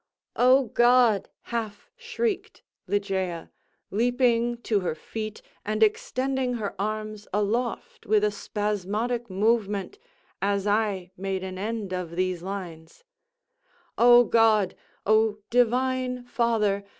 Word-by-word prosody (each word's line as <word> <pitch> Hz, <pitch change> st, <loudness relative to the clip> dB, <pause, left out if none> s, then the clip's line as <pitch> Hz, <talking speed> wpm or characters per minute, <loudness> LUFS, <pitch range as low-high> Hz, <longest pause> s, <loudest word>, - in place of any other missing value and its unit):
"O 255 Hz, +2 st, +5 dB
God!" 240 Hz, -3 st, +4 dB, 0.2 s
half 220 Hz, -, -4 dB
shrieked 460 Hz, -3 st, -3 dB, 0.2 s
Ligeia, 190 Hz, -4 st, -2 dB, 0.4 s
leaping 240 Hz, +1 st, +2 dB
to 210 Hz, -3 st, +1 dB
her 180 Hz, -4 st, -2 dB
feet 215 Hz, +6 st, -6 dB, 0.2 s
and 215 Hz, +1 st, +1 dB
extending 255 Hz, +4 st, 0 dB
her 210 Hz, -4 st, -3 dB
arms 215 Hz, 0 st, -4 dB
aloft 220 Hz, +4 st, -2 dB
with 210 Hz, 0 st, +3 dB
a 210 Hz, -, +2 dB
spasmodic 210 Hz, +3 st, -2 dB
movement, 210 Hz, -, 0 dB, 0.4 s
as 200 Hz, 0 st, 0 dB
I 205 Hz, -4 st, 0 dB
made 190 Hz, 0 st, -3 dB
an 185 Hz, 0 st, -6 dB
end 210 Hz, -2 st, -3 dB
of 175 Hz, -2 st, -4 dB
these 185 Hz, -1 st, -1 dB
lines—"O 245 Hz, -, -1 dB
God! 220 Hz, -5 st, +3 dB, 0.3 s
O 215 Hz, 0 st, +3 dB
Divine 250 Hz, +1 st, +1 dB
Father! 225 Hz, -5 st, +1 dB
215 Hz, 105 wpm, -26 LUFS, 200-245 Hz, 0.4 s, O